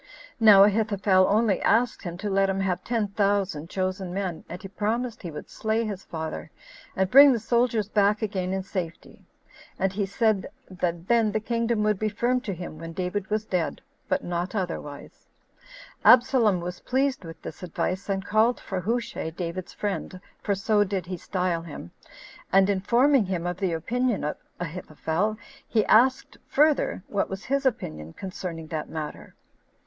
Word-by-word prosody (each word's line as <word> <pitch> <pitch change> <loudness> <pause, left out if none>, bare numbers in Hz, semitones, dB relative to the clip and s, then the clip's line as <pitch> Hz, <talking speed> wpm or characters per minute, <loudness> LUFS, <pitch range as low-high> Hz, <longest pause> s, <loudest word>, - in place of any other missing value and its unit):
Now 210 -3 +8
Ahithophel 200 -2 +3
only 210 -2 +2
asked 235 +3 +2
him 175 -2 -6
to - - 0
let 195 0 +3
him 195 0 -1
have 185 -2 -1
ten 225 -4 -1
thousand 200 -6 0
chosen 185 -1 -2
men, 185 -3 -3
and 175 - -6
he 195 - -8
promised 225 +4 -2
he 175 - -5
would 150 - -8
slay 220 +1 -1
his 200 -3 -5
father, 160 -1 -5 0.5
and 190 -1 0
bring 280 +2 +9
the 245 - +2
soldiers 235 -1 +1
back 210 0 +2
again 190 -3 -2
in 190 0 -2
safety; 175 -4 -6 0.5
and 190 0 0
he 200 0 -1
said 215 -1 +1 0.2
that 175 -1 -3
then 230 -3 +3
the 215 - 0
kingdom 230 0 0
would 210 -2 +1
be 215 - 0
firm 240 +4 0
to 225 - -4
him 170 -3 -8
when 165 0 -7
David 185 +2 -3
was 215 0 -1
dead 180 -5 -1 0.3
[but - - +1
not 175 +4 -3
otherwise]. 165 -7 -5 0.8
Absalom 240 -7 +5
was 180 +1 -5
pleased 270 -2 0
with 165 -1 -9
this - - -8
advice, 185 +2 -3
and 195 0 -1
called 220 +4 +3
for 190 - -4
Hushai, 230 -4 -2
David's 175 +2 -5
friend 195 -2 -4 0.2
[for 200 - 0
so 205 +2 +2
did 190 -3 -3
he 185 +1 -4
style 180 -1 -1
him]; 150 - -9 0.6
and 195 +1 +5
informing 235 +6 +3
him 180 -2 -2
of 175 0 -2
the 185 -3 -1
opinion 235 +8 -1
of 150 - -1 0.2
Ahithophel, 180 +4 -2 0.3
he 215 -3 +2
asked, 255 +4 +3
further, 295 -9 +2
what 200 - -1
was 195 +1 -6
his 275 0 +1
opinion 75 - -4
concerning 180 -3 -6
that 155 -2 -4
matter. 155 -2 -7
195 Hz, 170 wpm, -26 LUFS, 180-220 Hz, 0.8 s, bring